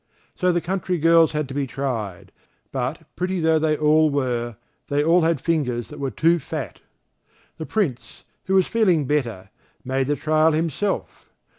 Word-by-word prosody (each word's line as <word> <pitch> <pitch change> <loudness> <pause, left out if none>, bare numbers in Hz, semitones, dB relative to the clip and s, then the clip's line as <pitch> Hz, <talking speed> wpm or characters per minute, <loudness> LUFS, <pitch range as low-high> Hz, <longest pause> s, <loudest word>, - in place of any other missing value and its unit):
So 180 0 +1
the 175 0 0
country 180 0 -2
girls 165 0 +4
had 150 -2 -1
to - - -6
be 140 -1 -1
tried, 115 -10 -4 0.4
but 135 +5 -3
pretty 185 +1 -2
though 160 -1 +3
they 155 -1 +1
all 155 +1 +4
were, 120 -5 -1 0.3
they 145 0 +1
all 170 +3 +4
had 165 -2 +1
fingers 125 -7 -1
that 150 - -10
were 140 -1 -1
too 165 +5 +2
fat. - - -6 0.8
The 160 - -5
Prince, 175 - -2 0.2
who 190 - +1
was 190 -2 +5
feeling 185 -10 +2
better, 115 -9 -2 0.3
made 130 0 0
the 145 - +1
trial 155 +1 +2
himself. 165 +5 -2
155 Hz, 165 wpm, -23 LUFS, 135-165 Hz, 0.8 s, was